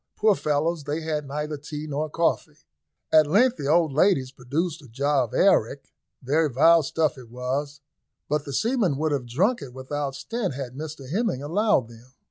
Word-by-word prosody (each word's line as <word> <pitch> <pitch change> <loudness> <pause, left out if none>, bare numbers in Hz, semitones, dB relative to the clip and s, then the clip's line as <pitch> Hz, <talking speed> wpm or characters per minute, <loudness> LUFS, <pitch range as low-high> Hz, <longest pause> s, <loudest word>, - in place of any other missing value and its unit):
Poor 215 0 +4
fellows! 155 -1 -1
they 150 +2 -2
had 155 -2 -3
neither 150 +2 -4
tea 150 +1 -7
nor 150 +1 -3
coffee. 155 -2 -1 0.5
At 155 -1 +6
length 235 - +3
the 140 - -4
old 160 -1 +3
ladies 145 -5 +2
produced 155 +7 -3
a 140 - -14
jar 135 +2 +1
of 115 - -13
arrack 135 - +2 0.3
very 150 +4 +2
vile 165 +6 +5
stuff 155 -1 -1
it 120 -3 -13
was, 135 +4 -4 0.5
but 150 -1 0
the 140 - -7
seamen 220 - +1
would 155 +1 0
have 135 -4 -2
drunk 185 - +1
it 130 -3 -9
without 135 +1 -4
stint 215 - -3
had 130 -3 -6
Mr 145 -1 -7
Hemming 200 - -1
allowed 180 - +1
them. 120 +2 -17
150 Hz, 180 wpm, -25 LUFS, 135-165 Hz, 0.5 s, At